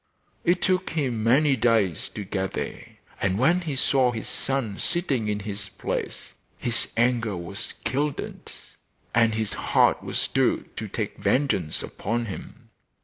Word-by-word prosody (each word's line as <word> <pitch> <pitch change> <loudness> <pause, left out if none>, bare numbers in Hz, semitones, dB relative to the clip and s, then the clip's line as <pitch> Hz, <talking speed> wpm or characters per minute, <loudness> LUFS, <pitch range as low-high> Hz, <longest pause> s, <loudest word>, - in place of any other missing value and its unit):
It 175 +1 +2
took 185 -1 +2
him 130 -8 -1
many 135 +5 +5
days 110 - +2
to 105 - -3
get 95 -1 -2
there, - - -5 0.2
and 95 -1 +2
when 165 - +4
he 155 -5 -3
saw 130 -1 +3
his 115 -2 -5
son 130 -7 -2
sitting 145 -10 0
in 105 0 -1
his 100 0 -5
place - - -4 0.2
his 120 -2 0
anger 115 -4 +2
was 85 +3 -5
kindled, 145 +2 -2 0.6
and 115 -1 +4
his 110 -2 -1
heart - - +3
was - - -3
stirred - - +1
to - - -3
take - - -3
vengeance 105 - +1
upon 115 +3 -2
him. 100 - -9
115 Hz, 145 wpm, -26 LUFS, 105-135 Hz, 0.6 s, many